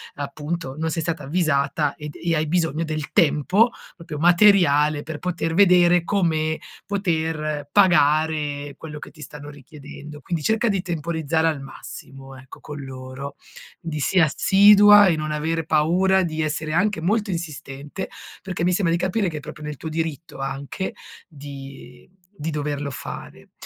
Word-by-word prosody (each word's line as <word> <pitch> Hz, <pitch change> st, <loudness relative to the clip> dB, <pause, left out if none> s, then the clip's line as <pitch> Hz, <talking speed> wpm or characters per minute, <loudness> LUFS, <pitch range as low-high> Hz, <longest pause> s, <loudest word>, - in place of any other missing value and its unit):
appunto, 145 Hz, 0 st, -5 dB
non 160 Hz, 0 st, -2 dB
sei 165 Hz, -, -2 dB
stata 160 Hz, -2 st, -3 dB
avvisata 150 Hz, -2 st, 0 dB
ed 150 Hz, -1 st, -8 dB
e 170 Hz, -1 st, -1 dB
hai 155 Hz, 0 st, 0 dB
bisogno 165 Hz, -1 st, 0 dB
del 155 Hz, -2 st, -4 dB
tempo, 180 Hz, -, +3 dB, 0.3 s
proprio 165 Hz, -3 st, -8 dB
materiale, 170 Hz, -4 st, +4 dB
per 155 Hz, 0 st, -7 dB
poter 170 Hz, -2 st, -2 dB
vedere 175 Hz, -2 st, +5 dB
come 160 Hz, -5 st, 0 dB, 0.3 s
poter 160 Hz, -6 st, -2 dB
pagare 150 Hz, -5 st, +2 dB
quello 150 Hz, -2 st, -8 dB
che -, -, -10 dB
ti 155 Hz, -, -16 dB
stanno 150 Hz, 0 st, -9 dB
richiedendo, 145 Hz, +1 st, -11 dB
quindi 160 Hz, +1 st, -4 dB
cerca 220 Hz, +2 st, +1 dB
di 195 Hz, -4 st, +1 dB
temporizzare 165 Hz, -2 st, -1 dB
al 155 Hz, -4 st, -1 dB
massimo, 135 Hz, 0 st, -11 dB
ecco, 130 Hz, 0 st, -13 dB
con 150 Hz, -1 st, -8 dB
loro, 130 Hz, +1 st, -8 dB, 0.4 s
di 160 Hz, -2 st, -5 dB
sì, 185 Hz, +6 st, +2 dB
assidua 205 Hz, +5 st, +7 dB
e 170 Hz, -, +3 dB
non 155 Hz, 0 st, -3 dB
avere 160 Hz, +1 st, -2 dB
paura 180 Hz, +5 st, +3 dB
di 160 Hz, -2 st, -2 dB
essere 155 Hz, 0 st, -2 dB
anche 185 Hz, +1 st, +1 dB
molto 205 Hz, +3 st, 0 dB
insistente, 150 Hz, 0 st, -6 dB, 0.3 s
perché 180 Hz, -3 st, -4 dB
mi 180 Hz, -, +2 dB
sembra 175 Hz, -3 st, +1 dB
di 170 Hz, -, 0 dB
capire 190 Hz, +1 st, 0 dB
che 155 Hz, -, -6 dB
è -, -, -4 dB
proprio 150 Hz, +1 st, -10 dB
nel 150 Hz, -2 st, -6 dB
tuo 160 Hz, -, -6 dB
diritto 160 Hz, -2 st, -4 dB
anche 135 Hz, +7 st, -4 dB, 0.3 s
di 135 Hz, -4 st, -11 dB, 0.3 s
di 155 Hz, +2 st, -4 dB
doverlo 145 Hz, -2 st, -3 dB
fare. -, -, -9 dB
155 Hz, 155 wpm, -23 LUFS, 145-175 Hz, 0.4 s, assidua